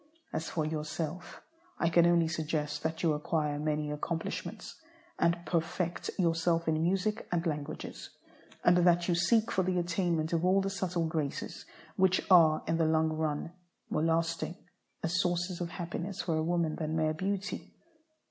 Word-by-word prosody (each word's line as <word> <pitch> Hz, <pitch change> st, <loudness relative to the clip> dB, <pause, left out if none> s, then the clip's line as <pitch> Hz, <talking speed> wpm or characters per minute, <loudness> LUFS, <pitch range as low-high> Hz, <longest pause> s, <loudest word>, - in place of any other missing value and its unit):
As 160 Hz, -, -2 dB
for 155 Hz, -3 st, -1 dB
yourself, 155 Hz, +2 st, -4 dB, 0.3 s
I 170 Hz, -, +2 dB
can 170 Hz, 0 st, +5 dB
only 170 Hz, -1 st, +4 dB
suggest 150 Hz, -2 st, -2 dB
that 160 Hz, +2 st, -3 dB
you 160 Hz, -2 st, +3 dB
acquire 150 Hz, -1 st, -1 dB
many 150 Hz, 0 st, -1 dB
accomplishments, 160 Hz, -, -4 dB, 0.4 s
and 170 Hz, 0 st, +2 dB
perfect 170 Hz, +1 st, -1 dB
yourself 165 Hz, -1 st, +1 dB
in 155 Hz, 0 st, +2 dB
music 195 Hz, +5 st, 0 dB
and 175 Hz, 0 st, 0 dB
languages, 150 Hz, -1 st, -4 dB, 0.5 s
and 175 Hz, 0 st, +6 dB
that 175 Hz, -1 st, +4 dB
you 175 Hz, -, +3 dB
seek 225 Hz, +6 st, +3 dB
for 190 Hz, -, +2 dB
the 180 Hz, 0 st, 0 dB
attainment 170 Hz, -2 st, 0 dB
of 165 Hz, 0 st, +1 dB
all 185 Hz, +2 st, +4 dB
the 195 Hz, 0 st, -1 dB
subtle 180 Hz, -3 st, -1 dB
graces, 155 Hz, -3 st, -3 dB, 0.3 s
which 185 Hz, 0 st, +4 dB
are, 160 Hz, -4 st, +6 dB
in 165 Hz, +1 st, 0 dB
the 165 Hz, -, +2 dB
long 160 Hz, 0 st, +3 dB
run, 155 Hz, 0 st, -2 dB, 0.4 s
more 155 Hz, -, +1 dB
lasting 165 Hz, +1 st, 0 dB, 0.5 s
as 175 Hz, +2 st, +1 dB
sources 175 Hz, 0 st, -1 dB
of 170 Hz, -, -2 dB
happiness 175 Hz, +2 st, -4 dB
for 165 Hz, -, 0 dB
a 155 Hz, -, +1 dB
woman 170 Hz, -2 st, 0 dB
than 155 Hz, 0 st, -2 dB
mere 155 Hz, -1 st, +1 dB
beauty. 195 Hz, +4 st, -3 dB
165 Hz, 160 wpm, -31 LUFS, 160-175 Hz, 0.5 s, and